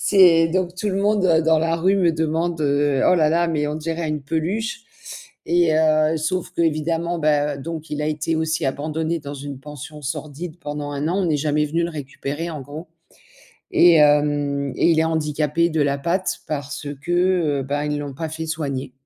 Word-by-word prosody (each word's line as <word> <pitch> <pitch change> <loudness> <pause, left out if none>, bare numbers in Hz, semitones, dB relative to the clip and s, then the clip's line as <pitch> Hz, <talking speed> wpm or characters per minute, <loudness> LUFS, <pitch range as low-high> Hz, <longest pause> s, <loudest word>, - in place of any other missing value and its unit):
C'est 175 -5 +5
donc 180 +1 -1
tout 210 +3 -2
le 195 - -1
monde 205 -1 +2 0.2
dans 160 -1 +5
la 165 +1 +1
rue 185 +4 +2
me 180 -3 +3
demande 160 +1 -1
heu: 145 -2 +1
«Oh - - +5
là 155 -3 +3
là, 170 +1 +2
mais 150 -3 0
on 150 - -3
dirait 165 +1 -3
une 150 -1 -3
peluche» 170 - -2 0.7
et 170 -1 +3
heu, 155 0 +3
sauf 170 +4 -2
qu'évidemment, 165 +1 0
bah, 150 -1 +1
donc 160 +2 -6
il 150 0 -2
a 150 - -1
été 155 +1 -1
aussi 160 -1 -1
abandonné 155 +4 -2
dans 145 0 -7
une 140 -1 -7
pension 150 +1 -10
sordide 155 +4 -6
pendant 145 -2 -5
1 145 +2 -2
an, 185 +4 0
on 170 - 0
est 150 - +2
jamais 150 +1 +1
venu 165 +3 0
le 170 - -3
récupérer 145 +2 -5
en 155 -3 -6
gros. 150 +5 -9 0.8
Et 175 -1 +6
hem, 145 -2 +2
et - - +3
il 160 - +3
est - - +3
handicapé 160 +1 0
de 155 -2 0
la 140 -1 0
patte 180 +5 -1
parce 145 0 -4 0.2
que, 175 - -4 0.5
heu, - - -4
ben 145 +2 -2
ils 150 0 -2
l'ont 145 -1 -5
pas 160 +2 -4
fait 160 +1 -5
soigner 140 -5 -3
155 Hz, 200 wpm, -22 LUFS, 145-165 Hz, 0.8 s, Et